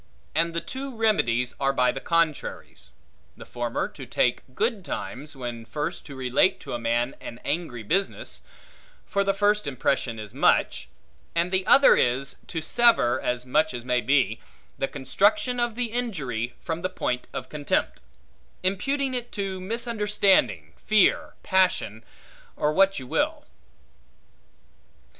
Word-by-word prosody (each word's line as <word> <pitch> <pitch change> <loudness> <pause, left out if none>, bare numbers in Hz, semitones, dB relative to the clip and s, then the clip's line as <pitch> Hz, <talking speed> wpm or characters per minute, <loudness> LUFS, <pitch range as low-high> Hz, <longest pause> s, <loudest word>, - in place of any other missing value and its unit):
And 165 +1 +1
the 170 - 0
two 265 +8 -6
remedies 125 - +1
are 135 0 +2
by 125 -2 +3
the 135 - -5
contraries. 165 -3 -1 0.5
The - - -10
former 120 -1 -2
to - - -10
take - - +1
good 220 -3 0
times, 140 - -6
when 120 -3 -6
first 150 +9 -4
to 140 - -9
relate 130 +7 +2
to - - -7
a 120 - -2
man 120 +2 0
an 115 - -8
angry 145 -7 -3
business; 190 - -2 0.6
for 200 - 0
the 195 0 +1
first 205 -3 +2
impression 130 -3 -1
is 105 -2 -8
much; - - +2 0.5
and 170 +2 +1
the 190 0 +1
other 275 - +7
is, 125 +3 +1
to 165 - -3
sever, 235 - +3
as 125 0 -2
much 150 +2 +1
as 120 0 -6
may 125 -1 +1
be, 120 -3 +2 0.4
the 135 - -1
construction 210 - +1
of 240 -2 0
the 240 -2 -2
injury 140 - -3
from 165 0 -4
the 185 - -1
point 125 -9 -2
of - - -5
contempt; 145 -1 -1 0.6
imputing 265 +9 0
it 245 -1 -3
to 195 -2 -3
misunderstanding, 205 - +1
fear, 215 -2 +3
passion, 180 - +1 0.5
or 150 +1 +1
what 195 +3 +4
you 130 - -5
will. - - -1
160 Hz, 145 wpm, -25 LUFS, 125-200 Hz, 0.6 s, other